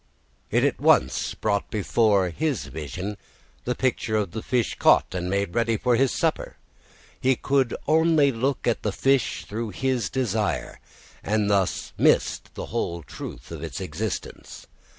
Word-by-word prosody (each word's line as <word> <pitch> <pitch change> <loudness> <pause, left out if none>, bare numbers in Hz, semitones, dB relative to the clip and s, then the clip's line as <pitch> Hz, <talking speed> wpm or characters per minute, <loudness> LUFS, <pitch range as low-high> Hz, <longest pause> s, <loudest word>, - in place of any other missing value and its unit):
It - - +2
at - - +1
once 65 - +3
brought 100 -2 -1
before 105 -3 +2
his 150 - -1
vision 80 +8 -5 0.5
the 125 - -1
picture 115 -4 0
of 105 -5 0
the 110 - -5
fish 120 -1 0
caught - - +4
and 90 -1 -2
made 100 -2 -1
ready 115 -1 +1
for 125 +2 +2
his 130 +2 +3
supper. - - -1 0.6
He 130 0 +3
could 135 -1 +1
only 160 -3 +4
look 130 +3 -1
at 120 - +1
the 105 - -1
fish 135 +5 +1
through 110 +2 -4
his 125 -1 -1
desire, 110 -5 -1 0.4
and 105 -1 +1
thus 100 -3 0
missed - - +2
the - - -5
whole 85 -1 -2
truth 60 -2 -9
of - - -6
its - - -5
existence. - - -5
110 Hz, 150 wpm, -25 LUFS, 100-130 Hz, 0.6 s, caught